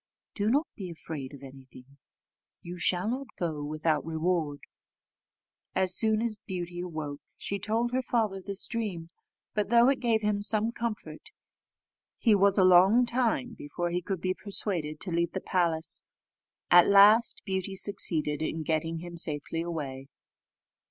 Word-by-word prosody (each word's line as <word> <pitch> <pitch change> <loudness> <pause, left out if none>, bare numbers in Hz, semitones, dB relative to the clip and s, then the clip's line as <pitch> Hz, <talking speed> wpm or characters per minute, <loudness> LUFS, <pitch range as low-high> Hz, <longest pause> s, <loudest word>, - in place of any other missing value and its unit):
Do 205 0 0
not 285 +7 +2
be 190 -5 -6
afraid 155 -5 -7
of 140 -2 -12
anything; 135 0 -14 0.7
you 175 +1 -7
shall 180 +2 +2
not 260 +4 -3
go 155 -4 -3
without 155 +1 0
a - - -12
reward." 160 -2 -1 1.1
As 185 -1 +3
soon 220 0 +2
as 225 -3 -2
Beauty 175 -2 -5
awoke, 155 -5 -5 0.2
she 200 - -3
told 225 +4 0
her 255 +1 +1
father 220 -6 -1
this 200 +1 -5
dream; 200 -8 -4 0.4
but 210 -1 -1
though 235 +2 +6
it 275 - +1
gave 230 -3 +1
him 210 -1 0
some 215 +2 0
comfort, 235 -2 -5 0.9
he 225 - +3
was 200 0 +4
a 190 - +5
long 185 +7 +6
time 245 0 0
before 175 +4 -4
he 175 +1 -1
could 185 0 -4
be 185 0 0
persuaded 175 -7 -2
to 185 - -2
leave 170 0 0
the 190 - -2
palace. 170 -4 -1 0.7
At 175 0 +8
last 205 +4 +6
Beauty 190 -1 -2
succeeded 160 -7 +1
in 160 0 -2
getting 160 +1 -1
him 175 0 -8
safely 160 0 -1
away. 140 -6 -5
185 Hz, 155 wpm, -28 LUFS, 160-215 Hz, 1.1 s, At